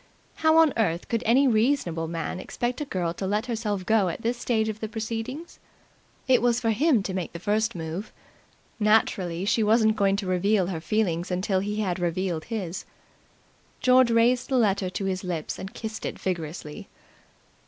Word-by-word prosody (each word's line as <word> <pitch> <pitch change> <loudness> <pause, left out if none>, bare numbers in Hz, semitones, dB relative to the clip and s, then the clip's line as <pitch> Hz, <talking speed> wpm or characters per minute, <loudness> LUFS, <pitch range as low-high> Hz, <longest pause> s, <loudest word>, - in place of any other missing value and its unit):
How 315 0 +4
on 320 -3 +5
earth 175 -6 0
could 230 -1 0
any 265 +5 +5
reasonable 215 - +1
man 165 +2 -4
expect 245 +7 -3
a - - -2
girl 175 -9 -2
to 190 +2 -4
let 210 +3 0
herself 215 -5 -2
go 215 -3 +3
at 170 - -6
this 235 +2 0
stage 230 -2 0
of 215 0 -4
the 220 - -3
proceedings? 225 +8 -5 0.7
It 255 -3 +4
was 240 0 +2
for 230 -2 +1
him 250 -1 +3
to 190 - -4
make 185 -3 -4
the 170 - -6
first 210 +4 0
move. 165 +5 -5 0.7
Naturally 195 -5 +2
she 225 +2 +2
wasn't 220 0 +4
going 195 -2 +2
to 200 0 -3
reveal 185 +2 +2
her 175 -3 -4
feelings 175 -4 0
until 185 +1 0
he 210 +2 -2
had 185 -3 -1
revealed 175 -1 -1
his. 195 -6 -4 1.0
George 255 -1 +5
raised 235 +2 +3
the 265 - +2
letter 200 -5 +2
to 195 +2 -4
his 190 0 -2
lips 170 -4 -4
and 190 +1 -6
kissed 220 -1 -6
it - - -4
vigorously. 165 -4 -5
210 Hz, 180 wpm, -26 LUFS, 180-230 Hz, 1.0 s, on